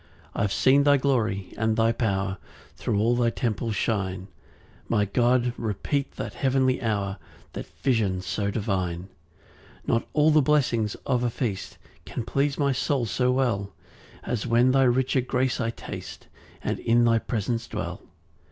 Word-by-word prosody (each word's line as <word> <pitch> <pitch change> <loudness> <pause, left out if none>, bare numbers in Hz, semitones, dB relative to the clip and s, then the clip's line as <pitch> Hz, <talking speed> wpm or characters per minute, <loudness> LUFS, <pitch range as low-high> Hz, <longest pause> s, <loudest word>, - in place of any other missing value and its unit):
3 - - -2
I've 100 -1 +1
seen 140 +6 +4
thy 145 0 +5
glory 110 -8 0
and 110 0 +1
thy 115 0 +4
power 95 -5 -1 0.4
Thro' - - -2
all 115 +4 +3
thy 120 -1 +2
temple 115 -1 -2
shine; 95 -3 -2 0.6
My 105 -3 +2
God, 120 +3 +2
repeat 115 +6 -2
that - - -5
heavenly 130 -1 +1
hour, 100 -5 -1 0.3
That - - -6 0.2
vision 105 -8 +1
so 100 +3 -2
divine. 95 -4 -2 0.8
4 - - +2
Not - - -15
all 155 +1 +4
the 155 0 +5
blessings 125 -7 +1
of 125 -2 +1
a 120 - +2
feast 115 -5 -4 0.3
Can 115 - -5
please 140 +3 0
my 140 -2 +2
soul 130 -1 0
so 125 +3 +1
well, 110 -7 0 0.5
As 120 -1 -2
when 120 +2 +4
thy 135 0 +4
richer 130 +1 +2
grace 125 0 0
I 115 - 0
taste, 115 - -8 0.4
And - - -2
in 120 +1 +3
thy 115 -1 +4
presence 115 +1 -2
dwell. - - -5
115 Hz, 160 wpm, -26 LUFS, 105-130 Hz, 0.8 s, thy